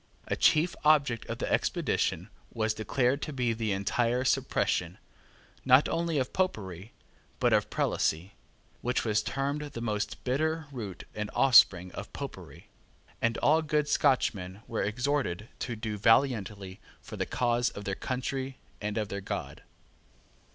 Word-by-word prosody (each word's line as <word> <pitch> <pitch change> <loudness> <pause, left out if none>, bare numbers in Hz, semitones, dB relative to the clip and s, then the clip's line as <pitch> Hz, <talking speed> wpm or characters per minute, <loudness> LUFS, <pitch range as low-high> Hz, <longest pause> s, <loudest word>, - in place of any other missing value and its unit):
A - - 0
chief 160 +3 +3
object 140 -6 +3
of - - -4
the - - -3
expedition - - 0 0.2
was 110 -1 0
declared 125 +5 0
to - - -4
be 125 -4 0
the 110 -2 -2
entire 115 +6 0
suppression, - - 0 0.7
not 130 +2 +6
only 165 -2 -1
of 130 -2 -1
Popery, 105 - -2 0.5
but - - +3
of - - +2
Prelacy, 85 +5 0 0.5
which 125 0 0
was 105 -1 +2
termed 140 +2 -2
the 145 -5 -6
most 105 -3 -3
bitter 155 +5 0
root 105 -9 -6
and 105 0 -4
offspring 90 -8 +6
of - - -8
Popery; 85 +8 -8 0.6
and 115 0 +1
all 155 +2 +5
good 150 -1 0
Scotchmen 115 -9 +1
were 115 - -2
exhorted 115 -3 -1
to 120 - -3
do 110 -1 -4
valiantly 105 -5 +2 0.2
for 115 - -10
the 95 -2 -2
cause 120 -1 +1
of 100 - -9
their 100 - -2
country 130 +3 -3 0.2
and 105 0 -3
of 105 -2 -1
their 100 0 -4
God. - - -5
115 Hz, 145 wpm, -29 LUFS, 105-135 Hz, 0.7 s, not